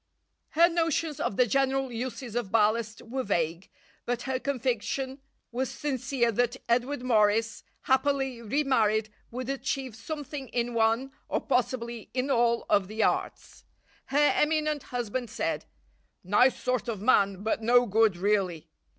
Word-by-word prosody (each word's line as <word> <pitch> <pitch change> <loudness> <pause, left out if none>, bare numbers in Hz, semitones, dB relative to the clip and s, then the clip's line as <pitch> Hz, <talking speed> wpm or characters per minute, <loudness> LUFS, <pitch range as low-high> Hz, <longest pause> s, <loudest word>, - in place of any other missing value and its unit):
Her 340 +1 +8
notions 330 -3 0
of 195 - -2
the 250 - +5
general 270 +1 +1
uses 240 0 -5
of 235 -6 -2
ballast 220 0 +1
were 260 +3 -3
vague, 170 -4 -1 0.4
but 245 0 -1
her 260 0 -2
conviction 265 +1 -2 0.3
was 250 +1 -2
sincere 260 -4 -1
that 245 +3 0
Edward 245 +3 0
Morris, 220 -2 +2 0.2
happily 265 -2 +1
re 270 +7 0
married, 220 -5 +2 0.2
would 250 +1 -5
achieve 270 -2 -3
something 290 +2 -6
in 240 0 -2
one, 230 +4 +1 0.2
or - - +1
possibly 235 -2 -2
in 260 +2 0
all, 235 -2 +2
of 195 -2 +2
the 220 +2 -1
arts. - - -2 0.4
Her 290 +2 +3
eminent 305 -1 +1
husband 245 0 -3
said: - - -2 0.6
"Nice 210 +8 +3
sort 250 -1 -1
of 225 -4 -3
man, 200 -3 +3
but 220 +1 0
no 245 +2 +5
good 220 -3 +3
really." 185 -4 0
245 Hz, 140 wpm, -28 LUFS, 220-265 Hz, 0.6 s, Her